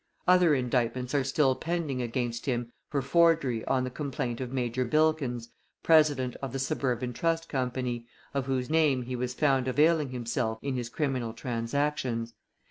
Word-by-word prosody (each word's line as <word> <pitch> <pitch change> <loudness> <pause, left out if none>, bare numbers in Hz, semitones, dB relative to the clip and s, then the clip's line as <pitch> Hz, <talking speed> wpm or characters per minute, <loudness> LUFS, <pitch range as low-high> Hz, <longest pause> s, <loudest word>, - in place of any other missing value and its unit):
Other 180 -4 +6
indictments 125 0 -1
are 140 -2 +2
still 135 0 +2
pending 160 -4 -2
against 120 +1 -3
him 120 -2 -1 0.2
for 140 -3 -1
forgery 150 -6 +3
on 130 -1 +1
the 130 - -3
complaint 125 -3 -3
of 125 -1 -4
Major 125 -1 -1
Bilkins, 135 -4 +1 0.3
president 145 -6 +4
of 135 -2 -4
the - - -1
Suburban 125 -2 -1
Trust 165 +3 0
Company, 125 -3 -2 0.3
of 135 -2 -1
whose 130 -2 -1
name 150 -5 +2
he 125 +1 -4
was 125 0 -3
found 135 -4 +2
availing 150 +2 +3
himself 115 -2 -2
in 140 -1 -1
his 120 -2 -3
criminal 125 -4 -2
transactions. 120 0 -2
130 Hz, 155 wpm, -29 LUFS, 120-145 Hz, 0.3 s, Other